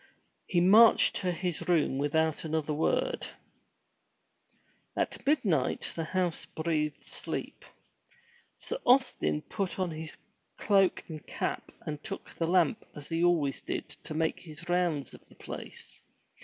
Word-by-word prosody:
He 175 - +2
marched 215 +6 +7
to 180 - 0
his 175 -1 -3
room 150 -6 +2
without 160 +2 +1
another 155 -1 -1
word. 465 - 0 1.7
At - - -2
midnight 190 - +1
the 165 - -2
house 180 -1 -1
breathed 155 -2 -2
sleep. - - -5 0.9
Sir 485 - -4
Austin 250 - +3
put 195 -2 -3
on 185 -3 -1
his 155 0 -7 0.4
cloak 195 -3 +3
and 155 -3 -8
cap - - -3
and 150 -1 -5
took 195 -2 -6
the 165 - -1
lamp 175 -3 +3
as 145 -1 -9
he 165 0 0
always 160 -6 +2
did - - -4
to 155 - -9
make 160 0 0
his 160 0 -11
rounds 175 -5 0
of - - -13
the - - -20
place. - - -9
165 Hz, 135 wpm, -30 LUFS, 155-185 Hz, 1.7 s, marched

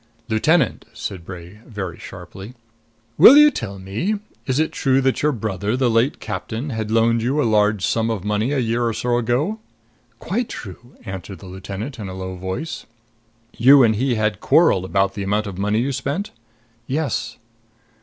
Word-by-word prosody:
"Lieutenant," 140 +6 +2
said 95 -4 -6
Bray 90 +3 -10
very 100 -7 -6
sharply, 100 +6 -10 0.6
"will 250 - +10
you 300 0 +8
tell 105 - -5
me 100 - -2 0.3
is 130 -1 0
it 155 +1 +1
true 135 -1 +2
that 130 0 +1
your 150 - +3
brother, 105 -2 -2
the 130 -2 +2
late 115 +5 +1
captain, 110 +7 -5
had 110 -2 -3
loaned 115 +1 +2
you 130 +6 0
a - - +3
large 105 -2 +2
sum 115 0 0
of 110 -5 -3
money 105 +5 0
a 145 - 0
year 120 -1 0
or 115 - -1
so 120 +2 0
ago?" 130 - -1 0.6
"Quite 220 - -2
true," 115 +4 -10
answered 95 0 -7
the 95 - -14
lieutenant 95 +7 -7
in 100 -3 -5
a 95 - -7
low 95 0 -5
voice. 95 - -5 0.7
"You 135 +3 +7
and 110 -2 +3
he 125 +2 0
had 105 -2 0
quarreled 100 - +4
about 95 +1 +1
the 100 - -5
amount 105 +2 0
of 95 -2 -7
money 105 +2 +1
you 135 +3 -1
spent?" 145 - -3 0.6
"Yes." 135 -4 -2
110 Hz, 175 wpm, -21 LUFS, 100-130 Hz, 0.7 s, will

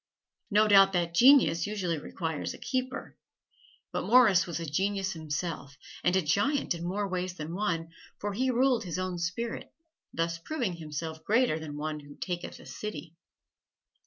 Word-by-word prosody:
No 215 0 +4
doubt 195 -1 +7
that 170 -2 0
genius 235 - +6
usually 185 -6 -2
requires 160 +1 -4
a - - -11
keeper. 255 0 -3 0.8
But - - -1
Morris 215 -7 +5
was 170 -1 -3
a 165 - -4
genius 195 +5 -1
himself 155 -3 -4 0.3
and 180 +1 +3
a 190 - +3
giant 260 - +1
in 170 0 -6
more 200 +4 -1
ways 185 -1 -3
than 160 0 -6
one, 170 -4 -1 0.3
for 205 0 -3
he 260 +6 0
ruled 250 -1 +2
his 180 -2 -4
own 185 -1 -3
spirit, 205 +8 -3 0.4
thus 165 0 -2
proving 205 - -3
himself 160 0 -6
greater 225 -7 +2
than 150 -2 -7
one 155 0 -3
who 145 -1 -13
taketh 175 -2 -5
a - - -14
city. 170 -6 -7
180 Hz, 160 wpm, -29 LUFS, 165-210 Hz, 0.8 s, doubt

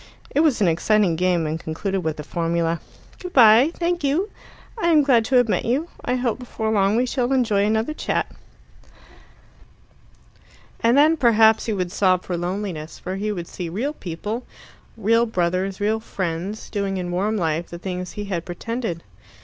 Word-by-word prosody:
It - - +2
was 300 -8 +3
an 195 - +4
exciting 175 +2 +2
game, 175 -1 +1
and 155 +1 -2
concluded 190 +5 -3
with 160 -3 -3
the 150 - -6
formula: 165 +1 -1 0.4
"Good 360 -1 -8
bye. 235 +3 +7
Thank 345 -1 -1
you. 330 +9 0 0.4
I 435 -7 -1
am 310 -3 +5
glad 250 -5 +4
to 260 - 0
have 245 -1 +5
met 215 - 0
you. 280 +9 -1
I 250 - 0
hope 250 -1 -1
before 220 -3 -3
long 200 -1 +2
we 245 +2 +2
shall 250 0 -1
enjoy 230 -7 +2
another 220 +7 0
chat." - - -1 2.5
And 235 +3 +3
then 310 +3 +5
perhaps 225 -4 +4
he 220 - 0
would 180 -3 -2
sob 185 -2 +2
for 180 - -3
loneliness, 175 -2 -4
for 185 - -5
he 210 +2 -2
would 175 -4 -5
see 175 -3 -6
real 240 - -2
people 210 - -5 0.5
real 230 +2 +2
brothers, 185 -1 -1
real 215 +2 +1
friends 190 -1 -4
doing 200 -2 -2
in 175 -1 -3
warm 205 +5 0
life 165 -2 -1
the 170 - -7
things 180 0 -5
he 205 - -5
had 180 -5 -3
pretended. 180 0 -4
205 Hz, 175 wpm, -22 LUFS, 175-240 Hz, 2.5 s, bye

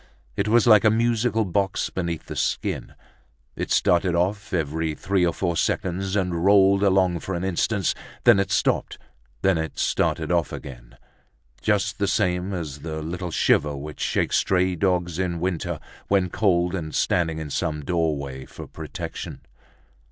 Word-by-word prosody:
It - - 0
was 115 +2 +4
like 110 -3 +7
a 110 - +6
musical 115 0 +1
box 95 +1 -1
beneath 85 -3 -3
the - - -7
skin; - - -2 0.6
it - - -4
started 90 0 +2
off 95 +5 -1
every 80 -2 -1
three 95 +3 0
or 85 - +3
four 85 0 -2
seconds 95 +3 -1
and 90 -4 0
rolled 100 0 +5
along 95 -3 +3
for 95 +3 -4
an 85 - -3
instant; 95 +1 0 0.3
then 120 -5 +6
it 100 - 0
stopped - - +1
and - - -27 0.4
then 95 -3 +3
it 80 0 -4
started 80 +1 0
off 85 -2 +1
again, - - -9 0.6
just - - 0
the - - +1
same 90 +1 0
as 80 -6 -5
the 80 0 -5
little 90 +3 -4
shiver 75 -2 +2
which 75 +2 -8
shakes - - +1
stray 95 -1 +2
dogs 90 -2 0
in 90 -2 -1
winter, 90 -1 -2 0.3
when 95 -3 +2
cold 90 -4 +2
and 80 -5 -4
standing 80 -3 +1
in 80 -2 -6
some 75 -3 -2
doorway 70 -6 -1
for - - -9
protection. - - -7
90 Hz, 160 wpm, -24 LUFS, 80-95 Hz, 0.6 s, like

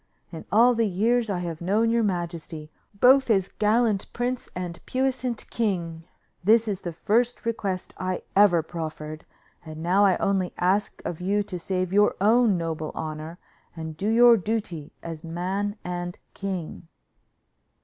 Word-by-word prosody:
In 165 - -8
all 235 +4 +6
the 230 -1 +1
years 225 +5 +1
I 195 - 0
have 170 -2 -5
known 215 +6 +2
your 235 0 +2
majesty, 170 -5 -3 0.3
both 265 +2 +6
as 195 -4 +2
gallant 215 -1 +2
prince 245 +1 -2
and 175 -1 -5
puissant 255 -2 -1
king, 170 -7 -2 0.4
this 225 +3 +4
is 200 -2 -2
the 175 - -4
first 235 +9 0
request 200 -5 -3
I 185 -1 -2
ever 190 -5 +5
proffered, 155 -2 -6 0.4
and 155 -1 -8
now 185 +4 +3
I 190 -2 +4
only 190 -2 0
ask 190 +4 0
of 175 0 -4
you 200 +3 +1
to 180 -2 -6
save 185 +1 -2
your 205 +1 +4
own 220 0 +4
noble 160 -2 -3
honor, 155 +2 -5 0.4
and 160 -1 -6
do 195 +6 -3
your 235 +1 +7
duty 190 -7 -3
as 165 -1 -7
man 185 +5 -2
and 175 0 -4 0.2
king." 185 -4 -5
190 Hz, 150 wpm, -25 LUFS, 170-220 Hz, 0.4 s, your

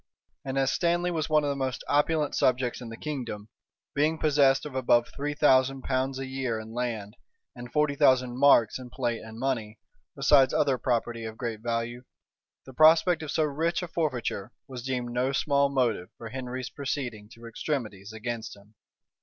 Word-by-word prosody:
And 135 0 -4
as 135 -1 +2
Stanley 175 +1 +1
was 160 -1 -2
one 155 -1 +3
of 145 - 0
the - - -2
most 130 -2 -3
opulent 150 +1 +1
subjects 125 -1 +1
in 120 - -7
the 115 - -8
kingdom, 120 -8 -5 0.4
being 155 +3 +1
possessed 140 -3 +3
of 150 - -7
above 120 -2 +2
three 145 +1 -3
thousand 135 -2 +3
pounds 130 0 -1
a 135 - -4
year 130 -4 -3
in 110 +1 -9
land, 115 -4 -3 0.4
and 120 -1 -9
forty 150 -1 +2
thousand 130 -3 +3
marks 130 -5 +5
in 125 -1 -9
plate 120 -3 -2
and 110 0 -10
money, 115 -4 -2 0.4
besides 135 -1 +4
other 135 -3 +2
property 120 -2 -1
of 110 0 -7
great 115 -4 -4
value, 115 +1 -3 0.6
the 130 - -12
prospect 160 +3 +5
of 155 - -6
so 155 - +1
rich 160 +4 -1
a - - -4
forfeiture 130 - -2 0.2
was 130 -2 -7
deemed 125 -1 -3
no 125 +2 0
small 140 0 +2
motive 120 -9 0
for 115 - -8
Henry's 130 0 -5
proceeding 125 -7 -4
to 115 0 -14
extremities 115 -5 -4
against 110 0 -5
him. 105 +1 -20
130 Hz, 180 wpm, -27 LUFS, 115-145 Hz, 0.6 s, marks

